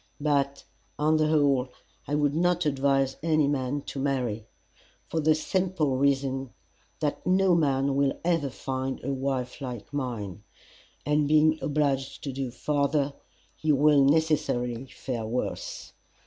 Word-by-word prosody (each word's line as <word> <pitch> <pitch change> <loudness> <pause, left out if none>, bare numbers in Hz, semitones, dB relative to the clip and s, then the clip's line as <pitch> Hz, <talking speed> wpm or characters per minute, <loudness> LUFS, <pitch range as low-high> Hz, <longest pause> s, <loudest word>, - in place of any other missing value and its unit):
But, 140 -2 0 0.3
on 155 +1 +3
the 155 0 +2
whole, 140 -4 +2 0.4
I 145 - 0
would 145 -1 +2
not 175 +1 +1
advise 135 -1 +1
any 155 -2 +2
man 140 0 -1
to 140 - -6
marry, 125 -6 -1 0.6
for 165 - -2
the 155 0 +4
simple 175 -4 0
reason 135 -1 0 0.5
that 150 -2 -1
no 185 0 +4
man 140 -4 +2
will 140 -1 +1
ever 165 -5 +1
find 130 0 -4
a 140 +2 -1
wife 130 -1 -3
like 125 0 -7
mine, 115 -8 -4 0.6
and 150 0 +2
being 155 +1 +4
obliged 140 -2 -1
to 140 - -4
go 135 -1 -3
farther, 140 +2 0 0.4
he 155 - 0
will 145 0 +5
necessarily 135 -5 +1
fare 120 -3 -5
worse. 120 +3 -4
140 Hz, 135 wpm, -27 LUFS, 135-150 Hz, 0.6 s, will